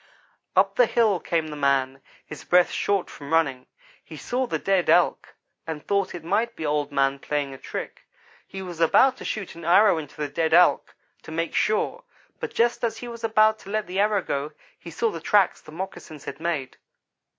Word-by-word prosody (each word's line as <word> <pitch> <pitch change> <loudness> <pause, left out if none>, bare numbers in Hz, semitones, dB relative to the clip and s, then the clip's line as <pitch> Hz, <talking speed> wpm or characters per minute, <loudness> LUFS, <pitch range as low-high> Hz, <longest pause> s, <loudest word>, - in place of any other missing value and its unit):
"Up - - +3
the - - +5
hill 215 -6 +2
came 165 -1 -1
the 150 - -6
man, 135 -2 0 0.2
his 155 - -10
breath 180 0 +4
short 200 -2 0
from 140 0 -10
running. 145 -6 +1 0.4
He - - -11
saw 255 +1 -2
the - - -1
dead 195 -4 +1
Elk, 175 +2 +2 0.3
and 160 -2 -6
thought 200 -2 0
it 170 - -8
might 220 +7 0
be 160 - -5
Old 145 -1 -1
man 135 0 +1
playing 145 -1 -2
a - - -9
trick. - - -7 0.4
He 190 0 -7
was 175 -3 -8
about 255 +11 +5
to - - -9
shoot 205 -4 -4
an 170 - -11
arrow 175 +1 +5
into 145 -3 -10
the 150 -1 -2
dead 160 +3 +1
Elk 180 0 +4 0.3
to - - -11
make 165 +1 -2
sure; 335 - 0 0.4
but - - -4
just 240 +1 +1
as 230 - -1
he 245 - -7
was 235 -1 -9
about 220 -1 +3
to 195 - -13
let 215 +1 -1
the 185 +2 -4
arrow 205 -2 +2
go, 145 +2 -3 0.3
he 170 - -10
saw 220 +8 -1
the 165 - -7
tracks 200 +3 +2
the 155 - -14
moccasins 160 -3 -8
had 140 0 -7
made. 155 -6 -3
170 Hz, 205 wpm, -24 LUFS, 150-210 Hz, 0.4 s, the